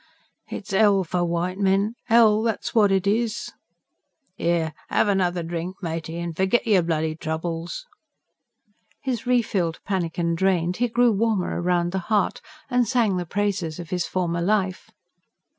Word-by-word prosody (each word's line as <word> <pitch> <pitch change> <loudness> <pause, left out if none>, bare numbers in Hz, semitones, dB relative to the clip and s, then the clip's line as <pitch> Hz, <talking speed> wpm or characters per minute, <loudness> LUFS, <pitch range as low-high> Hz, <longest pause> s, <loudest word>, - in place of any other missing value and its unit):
"It's 200 -2 -6
'ell 200 -1 +4
for 180 +1 -1
white 175 +2 -1
men 200 +2 +2 0.2
'ell, 220 -2 +5
that's 225 -1 -2
what 210 -3 +4
it 195 -1 +2
is!" 220 +2 0 0.9
"'Ere, 165 -2 0 0.2
'ave 205 - +2
another 180 -3 0
drink, 170 +2 -4
matey, 165 0 -4
and 170 -1 -4
fergit 190 +7 +1
yer 205 -5 +4
bloody 160 -2 -1
troubles." 165 - -4 1.2
His 250 -4 -3
re 245 -1 +4
filled 175 -6 -1
pannikin 170 -3 -1
drained, 180 0 +1
he 245 - +2
grew 240 +1 +3
warmer 210 -4 0
round 175 -1 +1
the 190 - -1
heart; 210 -3 +1 0.3
and 245 -2 +2
sang 230 -7 +2
the 175 -1 -3
praises 185 -5 -1
of 170 -2 -8
his 180 -1 -1
former 175 -2 -1
life. 190 0 0
185 Hz, 150 wpm, -24 LUFS, 170-210 Hz, 1.2 s, ell